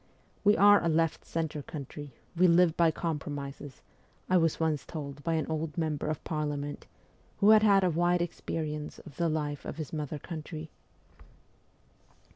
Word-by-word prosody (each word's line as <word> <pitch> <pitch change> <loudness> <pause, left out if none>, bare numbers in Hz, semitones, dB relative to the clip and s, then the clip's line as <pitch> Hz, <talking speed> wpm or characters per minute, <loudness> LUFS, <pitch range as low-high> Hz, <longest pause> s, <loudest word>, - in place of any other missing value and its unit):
' - - -35
We 205 +1 +5
are 205 -1 +7
a 170 - +2
left 165 0 +1
centre 160 -2 -3
country, 145 0 -8 0.2
we 180 +2 +5
live 170 -1 +5
by 170 -1 +4
compromises,' 145 -4 -5 0.5
I 185 - +6
was 165 -2 +2
once 160 -3 0
told 145 -3 -7
by 165 -1 0
an 155 -2 0
old 160 0 -3
member 155 -3 -1
of 155 -1 -3
Parliament, 145 -2 -3 0.5
who 205 +2 +6
had 215 -1 +7
had 200 -3 +5
a 180 - +3
wide 175 +2 +2
experience 150 -3 -4
of 150 -6 -13
the 170 -1 +1
life 150 -2 -2
of - - -6
his 155 -2 -6
mother 150 -1 -3
country. 155 0 -7
160 Hz, 165 wpm, -30 LUFS, 150-170 Hz, 0.5 s, are